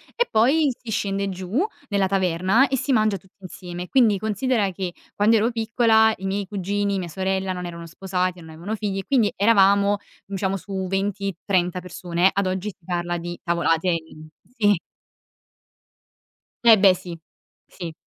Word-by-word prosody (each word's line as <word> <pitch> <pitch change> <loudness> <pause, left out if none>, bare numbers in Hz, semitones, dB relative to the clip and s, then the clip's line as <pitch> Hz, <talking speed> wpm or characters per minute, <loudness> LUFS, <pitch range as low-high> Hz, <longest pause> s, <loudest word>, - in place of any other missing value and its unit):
e 485 - +1
poi 270 +8 +4
si 245 - -11
scende 200 -2 -1
giù 190 - -1 0.2
nella 200 -2 +1
taverna 190 +6 +2
e 270 - 0
si 270 +2 0
mangia 215 -3 +2
tutti 190 -1 -24
insieme. 180 -1 -8
Quindi, 230 -6 +4
considera 215 +1 0
che 185 -1 -5 0.2
quando 210 +3 +3
ero 225 +2 +2
piccola 225 -1 +3
i 190 - -8
miei 195 0 -2
cugini, 200 0 -1
mia 180 - -4
sorella, 190 +2 -1
non 180 -1 -4
erano 170 -1 -7
sposati, 180 +1 -2
non 160 -1 -12
avevano 175 +7 -5
figli, 200 -2 -3
e 195 - -6
quindi 245 -7 +2
eravamo, 200 -1 +4 0.3
mhmm, 200 - -5
diciamo 190 0 -1
su 190 0 -5
20-30 195 -2 -1
persone. 180 0 0
Ad 200 -1 0
oggi 185 +2 -2
si 175 -4 -15
parla 175 -1 -2
di 175 +1 -6
tavolate 170 0 +1
in 160 -2 -4 0.3
sì! 205 -5 +3 1.8
Fe 230 -2 +8
beh, 195 -1 +6
sì! 180 -2 -8 0.5
Sì. 170 -2 -8
195 Hz, 165 wpm, -23 LUFS, 180-210 Hz, 1.8 s, Fe